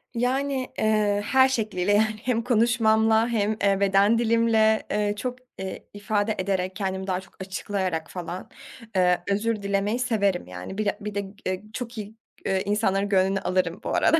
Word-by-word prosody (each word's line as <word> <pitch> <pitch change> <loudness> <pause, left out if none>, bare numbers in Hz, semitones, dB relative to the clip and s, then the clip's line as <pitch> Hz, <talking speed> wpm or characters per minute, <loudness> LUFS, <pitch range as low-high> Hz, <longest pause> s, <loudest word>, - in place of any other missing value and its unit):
Yani, 260 +2 -1
eee, 210 -1 +2
her 265 +3 +5
şekliyle, 210 -6 0
yani, 215 +1 +3
hem 245 -2 +1
konuşmamla 225 -1 +3
hem, 215 -2 0
eee, 200 -1 +3
beden 200 +3 +4
dilimle, 225 -1 +3
eee, 210 0 +1
çok, 250 +3 -4 0.2
eee, 190 0 -6
ifade 205 +1 -1
ederek, 185 -1 -1
kendimi 190 -1 -3
daha 185 -1 0
çok - - -19
açıklayarak 190 -3 -3
falan, 180 0 -6 0.5
eee, 180 -1 +3
özür 210 +1 0
dilemeyi 200 +3 0
severim, 200 -7 0
yani, 90 - -7
bir 215 - -1
de 205 - 0
bir 210 0 -5
de - - +1
g 195 0 -10
eee, 185 +1 -2
çok 240 -1 -6
iyi, 210 0 -7 0.3
iii, 190 0 +1
insanların 200 -1 +1
gönlünü 195 0 +2
alırım 185 -2 -1
bu - - -3
arada. 325 - +4
205 Hz, 170 wpm, -25 LUFS, 190-225 Hz, 0.5 s, her